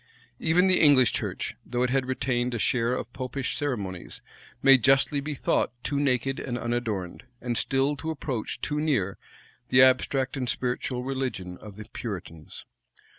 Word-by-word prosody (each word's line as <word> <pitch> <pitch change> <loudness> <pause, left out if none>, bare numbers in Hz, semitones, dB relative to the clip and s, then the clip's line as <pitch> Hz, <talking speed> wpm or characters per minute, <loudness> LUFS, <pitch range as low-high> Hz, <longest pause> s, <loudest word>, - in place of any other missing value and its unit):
Even 175 +3 +3
the 185 -1 +4
English 140 -5 +6
church, - - -3
though 125 0 -1
it 125 - 0
had 130 -1 +1
retained 125 -1 -1
a - - -1
share 120 +2 +1
of 120 -1 -6
Popish 130 0 -3
ceremonies, 100 - -4 0.4
may 135 0 +8
justly 135 +3 +3
be 150 +1 -4
thought - - +1
too 140 - -1
naked 135 -1 0
and 120 -2 -3
unadorned, 115 -7 -3 0.2
and 120 -1 -3
still 135 +4 +1
to 160 +2 -5
approach 135 -7 -3
too 150 0 -2
near 120 -12 0 0.5
the 130 0 +7
abstract 130 +1 +2
and 130 -3 -2
spiritual 125 +1 -2
religion 130 -9 -3
of 105 -2 -11
the 110 +1 -9
Puritans. 90 -8 -7
125 Hz, 160 wpm, -27 LUFS, 120-135 Hz, 0.5 s, may